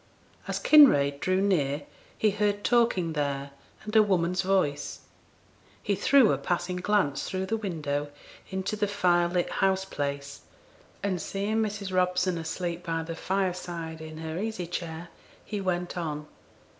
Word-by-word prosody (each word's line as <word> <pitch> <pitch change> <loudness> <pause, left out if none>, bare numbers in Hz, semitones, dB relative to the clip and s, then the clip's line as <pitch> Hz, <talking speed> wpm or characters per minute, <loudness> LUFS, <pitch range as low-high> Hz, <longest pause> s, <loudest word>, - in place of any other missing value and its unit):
As - - -1
Kinraid 140 - +6
drew 185 +3 +1
near 150 -7 +1 0.3
he 215 - +3
heard 205 0 0
talking 230 -9 +2
there, 140 -2 -2 0.3
and 215 +1 -6
a 220 - +9
woman's 180 -3 +1
voice; 185 -7 0 0.8
he 205 - +1
threw 240 +4 +5
a 135 - 0
passing 175 +4 -1
glance 180 -7 +1
through 190 0 -2
the 225 - -1
window 150 -9 -3 0.4
into 190 +2 -2
the 210 -1 0
fire 180 -4 +2
lit 175 0 -1
house 190 0 +2
place, 140 -4 -4 0.6
and 190 -3 -1
seeing 200 +3 -2
Mrs. 210 -3 -2
Robson 180 -1 +1
asleep 170 +2 -4
by 165 -1 -2
the 165 0 -6
fireside 175 -3 -3
in 155 0 -8
her 160 +1 -4
easy 215 -3 -3
chair, 170 0 -5 0.4
he 210 -2 -4
went 180 -1 -2
on. 150 -4 -3
180 Hz, 145 wpm, -28 LUFS, 160-200 Hz, 0.8 s, a